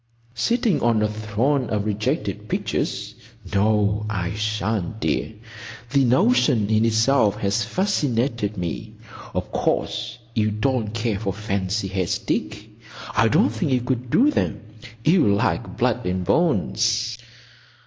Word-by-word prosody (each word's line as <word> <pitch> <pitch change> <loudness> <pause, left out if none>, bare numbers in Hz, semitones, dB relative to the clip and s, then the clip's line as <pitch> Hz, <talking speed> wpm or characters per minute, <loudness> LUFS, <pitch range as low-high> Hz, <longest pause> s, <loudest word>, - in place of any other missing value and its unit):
"Sitting 200 - +1
on 115 -2 +2
a - - +3
throne 110 +5 -1
of 105 -2 -1
rejected 105 0 -2
pictures? - - -2 0.4
No, 105 +1 +2
I 95 -3 -2
shan't, 110 -1 -2
dear. 110 - -1 0.6
The 140 -1 +4
notion 130 - +3
in 110 +1 +3
itself 115 -1 +3
has 100 +2 0
fascinated 120 - 0
me.—Of 85 -3 -6
course 115 -1 -1 0.2
you 110 -1 +1
don't 110 0 -1
care 115 -3 -1
for 100 -3 -2
fancy 100 0 -2
heads, 95 -2 -1
Dick. - - -3 0.5
I - - +4
don't - - +3
think 115 +4 -1
you 125 - +2
could 125 0 -2
do 275 - +4
them. - - -1 0.4
You 160 - +4
like 100 - -1
blood - - +1
and 90 0 -1
bones." 115 - +1
110 Hz, 130 wpm, -23 LUFS, 105-125 Hz, 0.6 s, The